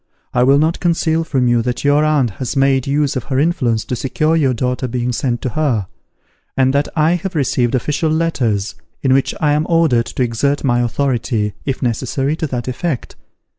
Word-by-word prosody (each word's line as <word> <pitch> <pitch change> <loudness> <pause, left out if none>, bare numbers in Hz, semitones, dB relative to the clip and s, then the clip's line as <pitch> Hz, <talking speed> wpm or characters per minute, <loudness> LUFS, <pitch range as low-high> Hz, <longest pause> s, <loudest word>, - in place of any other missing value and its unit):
I 125 - +2
will 135 +3 +5
not 160 +3 +1
conceal 165 -2 +1
from 135 -6 0
you, 120 -1 +3
that 125 +1 -3
your 145 +1 +3
aunt 150 -6 +2
has 130 - -3
made 135 -1 +2
use 145 0 +1
of 130 - -3
her 130 - -2
influence 135 -8 +1
to 125 - -3
secure 155 +6 0
your 145 -5 +2
daughter 125 +2 -1
being 125 0 -2
sent 120 -1 -2
to 130 - -1
her; 125 -6 0 0.7
and 130 0 +3
that 140 +1 +1
I 155 0 +3
have 180 +1 -6
received 130 -4 +1
official 150 +5 0
letters, 130 -11 0 0.3
in 130 -2 +3
which 135 0 +1
I 150 -2 +2
am 150 +2 0
ordered 155 -9 +3
to 130 - -2
exert 130 +5 0
my 120 -3 +2
authority, 120 -4 -1
if 135 -2 -2
necessary, 130 +4 -1
to 160 - -2
that 125 -3 -4
effect. 130 +1 -3
135 Hz, 195 wpm, -17 LUFS, 120-150 Hz, 0.7 s, will